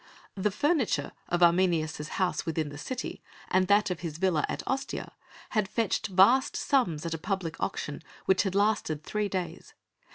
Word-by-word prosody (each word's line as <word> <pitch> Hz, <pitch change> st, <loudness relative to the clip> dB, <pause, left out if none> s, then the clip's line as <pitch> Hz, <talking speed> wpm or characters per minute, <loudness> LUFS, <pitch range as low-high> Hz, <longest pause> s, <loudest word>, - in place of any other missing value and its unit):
The 200 Hz, +1 st, 0 dB
furniture 255 Hz, -, +1 dB, 0.2 s
of 175 Hz, 0 st, +2 dB
Arminius' 170 Hz, -4 st, +2 dB
house 185 Hz, +1 st, -1 dB
within 160 Hz, -2 st, -2 dB
the 145 Hz, -, -9 dB
city 255 Hz, -, -5 dB, 0.3 s
and 185 Hz, 0 st, +3 dB
that 205 Hz, 0 st, +4 dB
of 175 Hz, -, -3 dB
his 160 Hz, -3 st, -5 dB
villa 175 Hz, -4 st, +2 dB
at -, -, -3 dB
Ostia 270 Hz, +1 st, -3 dB, 0.4 s
had 215 Hz, -4 st, +1 dB
fetched 225 Hz, -1 st, 0 dB
vast 200 Hz, +8 st, +5 dB
sums 175 Hz, -, +1 dB
at 165 Hz, -, -2 dB
a 165 Hz, -, -3 dB
public 190 Hz, -2 st, -3 dB
auction 150 Hz, -, -3 dB, 0.2 s
which 190 Hz, -1 st, +4 dB
had 195 Hz, -3 st, -2 dB
lasted 200 Hz, -7 st, +1 dB
three 210 Hz, +2 st, -1 dB
days. 180 Hz, -3 st, -5 dB
185 Hz, 165 wpm, -29 LUFS, 165-210 Hz, 0.4 s, vast